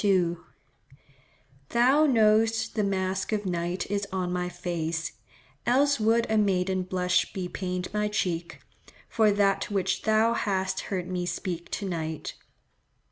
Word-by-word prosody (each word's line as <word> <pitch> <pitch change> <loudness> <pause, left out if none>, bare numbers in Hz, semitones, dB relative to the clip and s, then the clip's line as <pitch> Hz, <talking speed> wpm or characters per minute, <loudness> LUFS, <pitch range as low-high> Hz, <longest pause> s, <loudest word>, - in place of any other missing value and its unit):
2):— 180 -4 +2 1.3
"Thou 265 +6 +4
know'st 225 -2 +3
the 215 - 0
mask 190 0 -1
of 210 -1 -1
night 175 0 -2
is 200 0 -1
on 180 -1 -2
my 180 0 -1
face; 170 -2 -3 0.6
Else 280 +2 +3
would 225 +2 +3
a 220 0 +2
maiden 190 -2 +1
blush 180 0 0
bepaint 180 -1 -4
my 210 0 +1
cheek, 175 -5 -2 0.5
For 220 -2 +3
that 200 -1 +1
which 190 -2 0
thou 220 +1 +3
hast 190 -4 -1
heard 185 -3 -2
me 180 -1 -2
speak 175 -2 -4
to 200 - -2
night." 160 -3 -4
190 Hz, 135 wpm, -27 LUFS, 180-215 Hz, 1.3 s, Thou